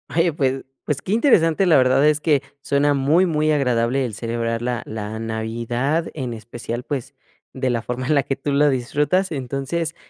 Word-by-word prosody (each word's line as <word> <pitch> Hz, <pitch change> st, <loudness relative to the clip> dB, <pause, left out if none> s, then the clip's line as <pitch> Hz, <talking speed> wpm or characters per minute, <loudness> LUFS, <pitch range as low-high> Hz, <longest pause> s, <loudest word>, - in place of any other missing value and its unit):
Oye, 170 Hz, +1 st, +3 dB
pues 135 Hz, -3 st, -1 dB, 0.2 s
pues, 150 Hz, -, -1 dB
qué -, -, -5 dB
interesante, 195 Hz, -, +4 dB
la 170 Hz, -4 st, +5 dB
verdad 130 Hz, +2 st, +4 dB
es 150 Hz, 0 st, +2 dB
que 150 Hz, -4 st, +3 dB, 0.2 s
suena 145 Hz, +1 st, +2 dB
muy 145 Hz, +7 st, +3 dB
muy 155 Hz, -3 st, +1 dB
agradable 130 Hz, -2 st, +1 dB
el 115 Hz, -, -5 dB
celebrar 115 Hz, +1 st, -2 dB
la 120 Hz, 0 st, -2 dB
la 110 Hz, 0 st, -5 dB
navidad, 115 Hz, +7 st, -2 dB
en 130 Hz, -5 st, -4 dB
especial, 120 Hz, +2 st, -6 dB
pues, 135 Hz, -1 st, -4 dB, 0.4 s
de 130 Hz, -1 st, -1 dB
la 120 Hz, -2 st, 0 dB
forma 125 Hz, +2 st, -4 dB
en 155 Hz, -, +3 dB
la 140 Hz, -, +3 dB
que 135 Hz, +2 st, -3 dB
tú 140 Hz, +1 st, -2 dB
lo 145 Hz, +1 st, +4 dB
disfrutas. 150 Hz, +8 st, 0 dB
Entonces, 140 Hz, +5 st, -3 dB
135 Hz, 185 wpm, -21 LUFS, 120-150 Hz, 0.4 s, la